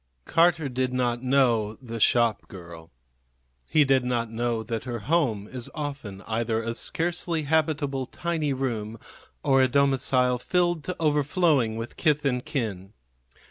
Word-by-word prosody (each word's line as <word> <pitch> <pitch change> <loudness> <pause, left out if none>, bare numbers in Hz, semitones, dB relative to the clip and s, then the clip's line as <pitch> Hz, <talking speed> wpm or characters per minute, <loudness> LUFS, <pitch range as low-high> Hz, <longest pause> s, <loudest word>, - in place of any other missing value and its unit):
Carter 165 -2 +3
did 130 0 -1
not 120 -1 0
know 120 -5 +2
the 115 -1 -8
shopgirl. 90 -8 0 0.8
He 155 - +5
did 135 -1 +3
not 120 -2 -1
know 115 0 -1
that 115 +1 -4
her 120 -2 -3
home 125 -8 0
is 125 -1 -6
often 140 -10 -6
either 110 +1 -1
a 115 +1 -3
scarcely 165 +3 -1
habitable 145 -3 0
tiny 165 -4 -2
room 115 -5 -3 0.5
or 135 -2 +4
a 130 - +4
domicile 130 -2 +2
filled 175 +2 0
to 180 - -3
overflowing 145 -5 +2
with 115 +1 -6
kith 150 -1 +1
and 125 -2 0
kin. 110 -10 -4
130 Hz, 140 wpm, -26 LUFS, 115-150 Hz, 0.8 s, He